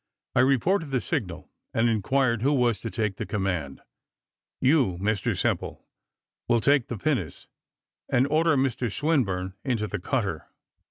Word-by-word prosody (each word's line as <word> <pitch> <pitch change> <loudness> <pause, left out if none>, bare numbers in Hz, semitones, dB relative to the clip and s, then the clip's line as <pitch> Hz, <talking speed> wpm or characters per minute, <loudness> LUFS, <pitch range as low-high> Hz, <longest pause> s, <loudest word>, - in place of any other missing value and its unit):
I - - +4
reported 140 - +2
the 135 -2 +1
signal, 110 - -4 0.2
and 115 +1 +3
inquired 115 +2 +1
who 140 +4 +2
was 120 -5 +2
to 115 - -5
take 105 -4 -2
the - - -3
command. 90 -9 -2 0.8
"You, 130 - +3
Mr 100 +2 -1
Simple, - - -2 0.6
will 120 - +3
take 140 +1 +3
the 120 - -4
pinnace, 125 - -2 0.6
and 125 - +3
order 155 +1 +2
Mr 130 -3 0
Swinburne 100 - 0
into 120 -6 -1
the 105 -1 -4
cutter." 95 - -2
120 Hz, 145 wpm, -26 LUFS, 100-140 Hz, 0.8 s, I